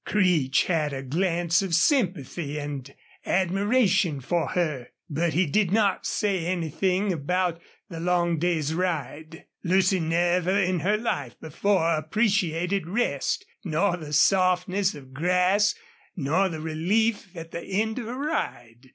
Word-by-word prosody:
Creech 170 Hz, -10 st, +2 dB
had 155 Hz, -5 st, 0 dB
a 135 Hz, 0 st, -5 dB
glance 170 Hz, +4 st, +1 dB
of 190 Hz, -4 st, 0 dB
sympathy 170 Hz, -, 0 dB
and 145 Hz, -2 st, -6 dB, 0.3 s
admiration 195 Hz, -, +1 dB
for 165 Hz, +5 st, -1 dB
her, 150 Hz, -9 st, -2 dB, 0.2 s
but 160 Hz, +2 st, -1 dB
he 185 Hz, +3 st, +3 dB
did 180 Hz, +4 st, +1 dB
not 205 Hz, -2 st, +1 dB
say 190 Hz, -5 st, -1 dB
anything 185 Hz, +3 st, 0 dB
about 175 Hz, +2 st, -1 dB, 0.3 s
the 165 Hz, -3 st, -8 dB
long 170 Hz, -1 st, +1 dB
day's 160 Hz, -3 st, 0 dB
ride. 160 Hz, -2 st, -3 dB, 0.2 s
Lucy 185 Hz, +1 st, +3 dB
never 175 Hz, +3 st, +1 dB
in 185 Hz, -2 st, +1 dB
her 200 Hz, +7 st, +1 dB
life 145 Hz, -, -3 dB
before 165 Hz, +1 st, +1 dB
appreciated 180 Hz, 0 st, 0 dB
rest 240 Hz, -, -1 dB, 0.2 s
nor 175 Hz, +1 st, +1 dB
the 155 Hz, -4 st, -9 dB
softness 185 Hz, +3 st, +2 dB
of 130 Hz, -2 st, -13 dB
grass 180 Hz, +7 st, +2 dB, 0.4 s
nor 175 Hz, +5 st, +1 dB
the 160 Hz, -2 st, -5 dB
relief 195 Hz, +8 st, 0 dB
at 165 Hz, 0 st, -8 dB
the 170 Hz, -, -5 dB
end 220 Hz, +6 st, -1 dB
of 235 Hz, -, -6 dB
a 240 Hz, -, -5 dB
ride. 125 Hz, -, -4 dB
175 Hz, 135 wpm, -25 LUFS, 155-195 Hz, 0.4 s, he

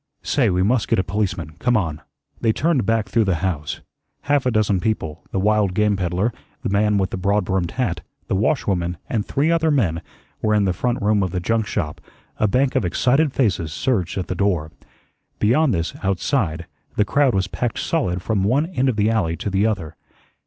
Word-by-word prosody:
Say, 130 Hz, -7 st, +2 dB
we 90 Hz, 0 st, +1 dB
must 115 Hz, +3 st, +2 dB
get -, -, +2 dB
a 95 Hz, -, +2 dB
policeman. 95 Hz, -6 st, -2 dB
Come 125 Hz, -1 st, +2 dB
on." 80 Hz, -7 st, -2 dB, 0.4 s
They 115 Hz, -, +2 dB
turned 145 Hz, -2 st, +1 dB
back 115 Hz, -2 st, +1 dB
through 110 Hz, +2 st, +2 dB
the 95 Hz, -3 st, +1 dB
house. 75 Hz, -5 st, -3 dB, 0.4 s
Half 140 Hz, -2 st, +1 dB
a -, -, +3 dB
dozen 105 Hz, -4 st, +2 dB
people 85 Hz, -7 st, -2 dB
the 95 Hz, -, -2 dB
wild 105 Hz, -2 st, +2 dB
game 105 Hz, 0 st, +2 dB
peddler, 95 Hz, +4 st, -1 dB, 0.3 s
the -, -, -1 dB
man 105 Hz, +1 st, +2 dB
with 95 Hz, -1 st, 0 dB
the -, -, -3 dB
broad 100 Hz, +1 st, +1 dB
brimmed 95 Hz, -2 st, 0 dB
hat, 110 Hz, -8 st, -1 dB, 0.3 s
the -, -, -1 dB
washwoman, 95 Hz, -, 0 dB
and 110 Hz, -4 st, -1 dB
three 150 Hz, +4 st, +1 dB
other 165 Hz, -1 st, +2 dB
men 95 Hz, -, +1 dB, 0.4 s
were 110 Hz, 0 st, +2 dB
in 105 Hz, -1 st, +3 dB
the 95 Hz, -, +1 dB
front 120 Hz, +6 st, -1 dB
room 105 Hz, 0 st, +3 dB
of 95 Hz, -, 0 dB
the 90 Hz, -, -2 dB
junk 110 Hz, +4 st, 0 dB
shop, 75 Hz, -, -3 dB, 0.4 s
a 110 Hz, -, +2 dB
bank 130 Hz, +6 st, +2 dB
of -, -, +2 dB
excited 130 Hz, -, +2 dB
faces 95 Hz, -, 0 dB
surged 90 Hz, -, -1 dB
at 95 Hz, -, -1 dB
the -, -, -2 dB
door. 90 Hz, -5 st, 0 dB, 0.7 s
Beyond 130 Hz, +7 st, +3 dB
this, 85 Hz, -4 st, -1 dB
outside, 95 Hz, -, 0 dB, 0.3 s
the 105 Hz, -, +2 dB
crowd 140 Hz, +1 st, +2 dB
was 95 Hz, -1 st, +2 dB
packed 120 Hz, +4 st, -3 dB
solid 90 Hz, -, -1 dB
from 105 Hz, -4 st, 0 dB
one 130 Hz, +10 st, +2 dB
end 135 Hz, -7 st, 0 dB
of 125 Hz, -, 0 dB
the 105 Hz, +1 st, +2 dB
alley 90 Hz, -8 st, 0 dB
to 100 Hz, -, -3 dB
the 100 Hz, +3 st, +2 dB
other. 95 Hz, -8 st, -3 dB
105 Hz, 205 wpm, -21 LUFS, 90-120 Hz, 0.7 s, a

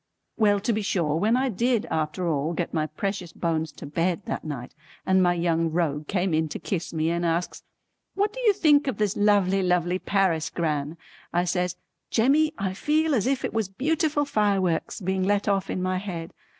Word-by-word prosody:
Well 205 Hz, -2 st, +3 dB
to 230 Hz, +3 st, 0 dB
be 215 Hz, -, -1 dB
sure 170 Hz, -7 st, 0 dB
when 220 Hz, +7 st, +2 dB
I 265 Hz, +1 st, +1 dB
did 235 Hz, +1 st, +1 dB
after 160 Hz, +3 st, -1 dB
all 155 Hz, +1 st, 0 dB
get 170 Hz, +1 st, -3 dB
my 155 Hz, -2 st, 0 dB
precious 180 Hz, +2 st, -4 dB
bones 160 Hz, -2 st, -2 dB
to -, -, -10 dB
bed 170 Hz, +6 st, -1 dB
that -, -, -4 dB
night, 140 Hz, -6 st, -6 dB, 0.3 s
and 190 Hz, 0 st, +4 dB
my 175 Hz, -1 st, +3 dB
Young 165 Hz, -1 st, +1 dB
Rogue 155 Hz, -3 st, -1 dB
came 185 Hz, -2 st, 0 dB
in 160 Hz, 0 st, +1 dB
to -, -, -4 dB
kiss 175 Hz, -4 st, -3 dB
me 160 Hz, 0 st, 0 dB
and 170 Hz, 0 st, -1 dB
asks 170 Hz, +1 st, -1 dB, 0.5 s
"What 410 Hz, +2 st, +1 dB
do -, -, -7 dB
you 450 Hz, -4 st, +4 dB
think 295 Hz, -7 st, +4 dB
of 255 Hz, -7 st, -1 dB
this 210 Hz, -2 st, 0 dB
lovely 200 Hz, -2 st, +3 dB
lovely 180 Hz, 0 st, +1 dB
Paris, 180 Hz, -6 st, +1 dB
Gran?" 155 Hz, -2 st, -2 dB, 0.3 s
I 175 Hz, +1 st, +2 dB
says 180 Hz, 0 st, -1 dB, 0.3 s
"Jemmy 285 Hz, +7 st, +3 dB
I 190 Hz, -1 st, -2 dB
feel 310 Hz, +8 st, +1 dB
as 235 Hz, -3 st, +1 dB
if 270 Hz, -1 st, 0 dB
it -, -, -4 dB
was 220 Hz, -4 st, -1 dB
beautiful 295 Hz, -, 0 dB
fireworks 200 Hz, -, 0 dB
being 190 Hz, +1 st, -1 dB
let 205 Hz, +2 st, +1 dB
off 195 Hz, -1 st, +1 dB
in 185 Hz, -, -2 dB
my 185 Hz, 0 st, 0 dB
head." 175 Hz, -4 st, -6 dB
185 Hz, 200 wpm, -25 LUFS, 165-215 Hz, 0.5 s, and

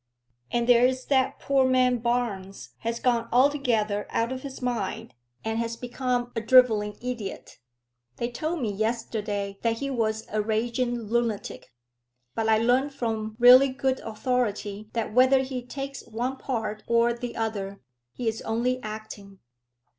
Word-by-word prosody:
"And 235 Hz, 0 st, 0 dB
there 245 Hz, 0 st, +6 dB
is 260 Hz, 0 st, -3 dB
that 265 Hz, -2 st, +2 dB
poor 275 Hz, -1 st, +2 dB
man 255 Hz, -1 st, +3 dB
Barnes 225 Hz, -5 st, -2 dB
has 230 Hz, +1 st, -3 dB
gone 235 Hz, -2 st, +1 dB
altogether 245 Hz, -6 st, +2 dB
out 230 Hz, +2 st, 0 dB
of 260 Hz, 0 st, -4 dB
his 275 Hz, -1 st, -8 dB
mind, 230 Hz, -2 st, -3 dB, 0.3 s
and 225 Hz, 0 st, -1 dB
has 230 Hz, 0 st, -2 dB
become 245 Hz, 0 st, -2 dB
a 225 Hz, -, -1 dB
drivelling 220 Hz, -4 st, +4 dB
idiot." 235 Hz, -6 st, -6 dB, 0.6 s
"They 235 Hz, +1 st, -3 dB
told 315 Hz, +4 st, -3 dB
me 215 Hz, -, 0 dB
yesterday 210 Hz, -2 st, -2 dB
that 230 Hz, -1 st, +2 dB
he 275 Hz, +3 st, -3 dB
was 220 Hz, -3 st, -1 dB
a 215 Hz, 0 st, +1 dB
raging 235 Hz, +3 st, -1 dB
lunatic; 220 Hz, -, -2 dB, 0.6 s
but 225 Hz, +5 st, -1 dB
I 220 Hz, -, +5 dB
learn 250 Hz, +5 st, +2 dB
from 220 Hz, -5 st, -3 dB
really 250 Hz, +3 st, +8 dB
good 260 Hz, 0 st, -1 dB
authority 215 Hz, -3 st, -2 dB
that 225 Hz, -2 st, -2 dB
whether 260 Hz, +2 st, +5 dB
he 260 Hz, -1 st, -4 dB
takes 275 Hz, +2 st, -6 dB
one 245 Hz, +4 st, -3 dB
part 220 Hz, -5 st, -3 dB
or 235 Hz, 0 st, +3 dB
the 240 Hz, 0 st, -6 dB
other, 200 Hz, -3 st, -3 dB, 0.3 s
he 240 Hz, -, -5 dB
is 225 Hz, 0 st, -1 dB
only 245 Hz, +3 st, -1 dB
acting." 215 Hz, -2 st, -8 dB
235 Hz, 150 wpm, -26 LUFS, 220-255 Hz, 0.6 s, really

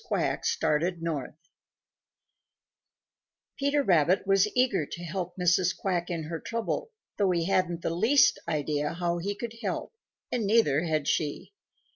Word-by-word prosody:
QUACK -, -, -1 dB
STARTED 165 Hz, +3 st, 0 dB
NORTH 155 Hz, -4 st, -3 dB, 2.2 s
Peter 285 Hz, +1 st, +2 dB
Rabbit 175 Hz, -, +3 dB
was 195 Hz, +1 st, +4 dB
eager 240 Hz, -, +2 dB
to 175 Hz, -, -7 dB
help 175 Hz, +1 st, -4 dB
Mrs. 180 Hz, +1 st, +2 dB
Quack 175 Hz, -3 st, -1 dB
in 170 Hz, -2 st, -3 dB
her 160 Hz, +1 st, -5 dB
trouble, 230 Hz, -, -3 dB, 0.3 s
though 200 Hz, -2 st, +3 dB
he 170 Hz, -2 st, +1 dB
hadn't 175 Hz, -2 st, 0 dB
the -, -, 0 dB
least 225 Hz, +11 st, +4 dB
idea 150 Hz, 0 st, -1 dB
how 175 Hz, 0 st, -1 dB
he 200 Hz, +4 st, -3 dB
could 230 Hz, +2 st, -6 dB
help -, -, -3 dB, 0.4 s
and 230 Hz, -5 st, -1 dB
neither 175 Hz, -8 st, +3 dB
had 155 Hz, -3 st, -1 dB
she. 150 Hz, -, -1 dB
175 Hz, 140 wpm, -28 LUFS, 165-200 Hz, 2.2 s, was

